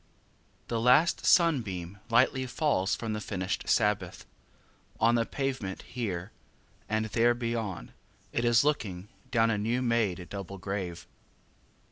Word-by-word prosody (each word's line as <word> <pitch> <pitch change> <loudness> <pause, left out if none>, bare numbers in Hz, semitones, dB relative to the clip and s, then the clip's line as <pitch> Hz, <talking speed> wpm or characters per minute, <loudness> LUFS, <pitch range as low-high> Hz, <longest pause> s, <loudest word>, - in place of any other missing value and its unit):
The 115 -1 -1
last 130 +8 +4
sunbeam 105 - +2
Lightly 130 +2 +3
falls 120 -8 +1
from 115 -2 -4
the 105 - -3
finished 95 -2 -3
Sabbath 105 -3 +1 0.7
On 115 +1 +4
the 115 -1 +1
pavement 130 -9 -3
here 100 -5 -4 0.6
and, 110 0 0
there 115 +3 +2
beyond, 115 -6 -3 0.4
it 120 - 0
is 120 0 +4
looking 105 -10 -1 0.2
Down 115 -1 +3
a 105 - 0
new 120 +4 0
made 105 -7 0
double 100 -1 -6
grave. 95 -2 -4
115 Hz, 125 wpm, -29 LUFS, 95-120 Hz, 0.7 s, last